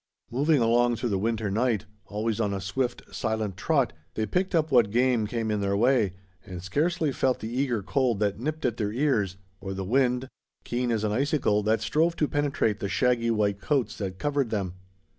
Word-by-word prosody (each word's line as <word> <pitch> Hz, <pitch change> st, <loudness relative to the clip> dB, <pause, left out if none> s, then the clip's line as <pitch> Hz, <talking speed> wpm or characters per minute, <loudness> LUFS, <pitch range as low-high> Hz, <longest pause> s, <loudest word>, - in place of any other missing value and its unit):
Moving 145 Hz, +4 st, +3 dB
along 120 Hz, +1 st, +3 dB
through 120 Hz, +1 st, -2 dB
the 100 Hz, -2 st, 0 dB
winter 110 Hz, -1 st, -1 dB
night, 115 Hz, 0 st, +1 dB, 0.2 s
always 110 Hz, +2 st, -1 dB
on 100 Hz, -2 st, 0 dB
a -, -, -3 dB
swift, 120 Hz, +7 st, -2 dB
silent 110 Hz, -4 st, -2 dB
trot, 135 Hz, -, +1 dB, 0.2 s
they 110 Hz, -, 0 dB
picked 180 Hz, -, 0 dB
up 160 Hz, -2 st, +1 dB
what 120 Hz, -5 st, +5 dB
game 120 Hz, -1 st, +2 dB
came 115 Hz, -1 st, -2 dB
in 105 Hz, -1 st, 0 dB
their 100 Hz, 0 st, +1 dB
way, 115 Hz, -4 st, +3 dB, 0.3 s
and 90 Hz, -2 st, -8 dB
scarcely 155 Hz, -, 0 dB
felt 130 Hz, -1 st, +1 dB
the 115 Hz, +2 st, -6 dB
eager 125 Hz, -6 st, 0 dB
cold 125 Hz, -1 st, +1 dB
that 105 Hz, -1 st, 0 dB
nipped 155 Hz, +4 st, -3 dB
at 120 Hz, -2 st, 0 dB
their 105 Hz, -2 st, -1 dB
ears, 110 Hz, -7 st, 0 dB, 0.2 s
or 95 Hz, 0 st, -5 dB
the 95 Hz, 0 st, -4 dB
wind, 125 Hz, +3 st, +2 dB, 0.4 s
keen 120 Hz, 0 st, -1 dB
as 110 Hz, -2 st, 0 dB
an 105 Hz, -, 0 dB
icicle, 130 Hz, -3 st, +1 dB
that 110 Hz, +2 st, +1 dB
strove 165 Hz, +2 st, +1 dB
to 150 Hz, -, +1 dB
penetrate 140 Hz, -8 st, 0 dB
the 100 Hz, -, -3 dB
shaggy 120 Hz, -1 st, +2 dB
white 105 Hz, -3 st, +1 dB
coats 130 Hz, +5 st, 0 dB
that 95 Hz, -3 st, -4 dB
covered 140 Hz, 0 st, 0 dB
them. 100 Hz, -5 st, -2 dB
115 Hz, 200 wpm, -27 LUFS, 105-130 Hz, 0.4 s, what